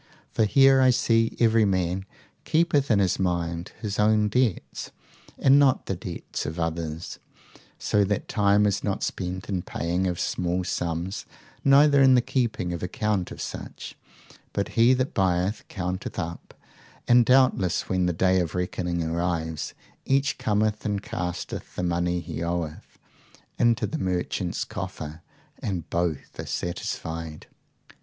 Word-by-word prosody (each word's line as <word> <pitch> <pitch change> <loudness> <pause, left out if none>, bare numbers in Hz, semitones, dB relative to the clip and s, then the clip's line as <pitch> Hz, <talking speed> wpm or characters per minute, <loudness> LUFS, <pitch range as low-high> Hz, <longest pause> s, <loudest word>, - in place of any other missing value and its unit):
for 110 - +2
here 135 +4 +6
I 130 - +6
see 115 -2 +2
every 115 -1 +4
man 95 -1 0 0.4
keepeth 155 -4 +2
in 110 - +4
his 95 -3 +1
mind 85 -2 -1
his 105 -3 -3
own 105 0 +3
debts, 120 -3 -1 0.5
and 135 +1 +5
not 135 -2 +3
the 95 - -2
debts 85 0 -6
of 80 +2 -5
others, 80 0 -3 0.6
so 105 - +2
that 100 +1 -2
time 105 0 +3
is 100 -1 0
not 100 -2 -1
spent 90 0 -3
in 95 -3 -1
paying 85 +2 -1
of 90 -1 -2
small 90 +1 -1
sums, 85 +2 -3 0.4
neither 140 +1 +6
in 130 -1 +7
the 125 - +5
keeping 115 -9 -1
of 85 - -5
account 100 0 -1
of - - -9
such; - - -7 0.6
but 100 - -1
he 120 +2 +4
that 130 +1 -1
buyeth 95 +2 0
counteth 90 -1 -4
up, 85 -2 -5 0.5
and 120 0 +6
doubtless 125 -8 +3
when 90 -1 +1
the - - +2
day 95 +2 +2
of 85 -2 -2
reckoning 90 -1 -2
arrives, 80 -1 -2 0.3
each 135 +1 +1
cometh 105 0 0
and 100 -1 -2
casteth 90 -6 -5
the 90 - -2
money 85 0 0
he 85 - -6
oweth 85 -2 -4 0.6
into 120 -1 +3
the 160 - -4
merchant's 90 -1 -1
coffer, 75 +2 -6 0.4
and 90 -5 -3
both 85 -4 -2
are - - -5
satisfied. 80 -2 -4
95 Hz, 145 wpm, -26 LUFS, 85-110 Hz, 0.6 s, in